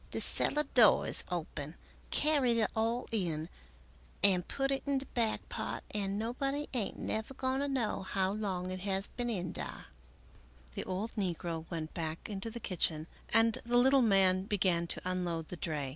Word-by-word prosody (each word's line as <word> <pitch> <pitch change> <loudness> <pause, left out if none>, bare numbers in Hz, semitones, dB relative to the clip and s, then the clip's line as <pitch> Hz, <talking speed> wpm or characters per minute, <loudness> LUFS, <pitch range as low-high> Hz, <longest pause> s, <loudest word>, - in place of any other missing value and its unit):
" - - -25
De - - -3
cellar 300 - +2
door 225 -5 +7
is - - +5
open, 155 -3 -4 0.3
carry 275 -6 +2
it 215 - +2
all 230 +2 0
in 170 -7 -1 0.7
and 180 -3 +5
put 270 0 -1
it 275 - 0
in 280 -1 +2
de 265 - -3
back 230 -4 -1
part - - -4
and 200 -1 -1
nobody 275 +6 -2
ain't 230 -6 -2
never 220 +5 -3
going 260 +1 -1
to 285 - 0
know 255 -6 -1
how 190 0 0
long 190 -3 -3
it 185 - -4
has 195 0 +1
been 240 0 -4
in 180 -6 -2
dar." - - -6 0.9
The - - -4
old 195 +5 -3
negro 170 -5 -3
went 160 -2 -5
back 160 -1 -4
into 205 +1 -4
the 235 +1 -7
kitchen 160 -6 0 0.2
and 225 0 +4
the 240 +1 +2
little 265 +2 +5
man 190 -4 +4
began 185 -4 +1
to - - 0
unload 175 -3 -2
the - - -5
dray. 150 -5 -3
200 Hz, 180 wpm, -32 LUFS, 180-240 Hz, 0.9 s, door